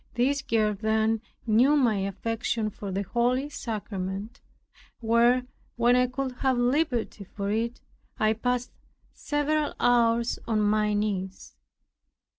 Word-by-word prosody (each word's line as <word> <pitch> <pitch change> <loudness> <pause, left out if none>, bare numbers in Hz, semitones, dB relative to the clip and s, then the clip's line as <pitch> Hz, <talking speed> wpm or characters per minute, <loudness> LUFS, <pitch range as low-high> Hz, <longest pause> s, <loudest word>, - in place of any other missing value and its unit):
This 275 +3 +1
girl 215 -2 +1
then 220 +1 0 0.2
knew 245 +6 +4
my 240 -7 +3
affection 215 +3 -2
for 200 0 -7
the 195 +2 -1
holy 250 +7 0
sacrament, 205 -4 -5 0.6
where, 235 +2 +3 0.3
when 240 +1 +4
I 250 0 +3
could 260 +1 -3
have 265 -2 +1
liberty 245 -4 0
for 200 +1 -4
it, 230 +3 -2 0.4
I 215 0 +2
passed 245 +2 -2 0.4
several 295 0 -1
hours 235 -1 +2
on 220 -2 +1
my 210 0 +2
knees. 195 -2 -3
230 Hz, 120 wpm, -27 LUFS, 210-250 Hz, 0.6 s, knew